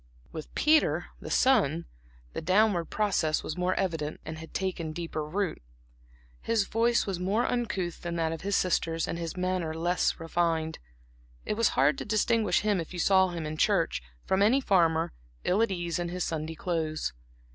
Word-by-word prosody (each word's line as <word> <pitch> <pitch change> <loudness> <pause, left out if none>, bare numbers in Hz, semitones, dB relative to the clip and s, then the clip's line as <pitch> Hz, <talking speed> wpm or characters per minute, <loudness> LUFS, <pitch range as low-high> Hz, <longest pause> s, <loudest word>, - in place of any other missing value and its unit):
With 155 - -8
Peter, 310 +1 +3
the - - -8
son, 170 - +3 0.5
the - - -4
downward 185 0 +3
process 180 -7 0
was 155 - -4
more 180 +1 0
evident 160 -6 -2
and 160 0 -6
had 160 - -10
taken 175 -4 -3
deeper 165 -2 -4
root. 180 +4 -2 0.8
His 225 -2 +1
voice 230 +3 +2
was 195 -4 -3
more 200 +6 +1
uncouth 200 -8 -2
than 170 -1 -4
that 165 -1 0
of 165 - -5
his 200 +1 0
sisters 165 -2 +1
and 170 - -3
his 165 +1 -5
manner 180 -3 -1
less 175 +3 0
refined; 165 -1 -1 0.7
it - - -1
was 230 +1 +3
hard 140 +2 +4
to - - -5
distinguish 215 -2 +2
him 205 -3 +1
if 165 - -8
you 175 - -5
saw 190 +1 +5
him 170 -3 -4
in 155 0 -4
church, - - +2 0.2
from 190 +1 +1
any 225 +7 +5
farmer, 165 - +2 0.3
ill 195 +4 +2
at 230 - +3
ease 175 -2 -2
in 175 0 -2
his 180 0 -2
Sunday 160 0 -3
clothes. 160 -2 -2
175 Hz, 180 wpm, -28 LUFS, 160-200 Hz, 0.8 s, saw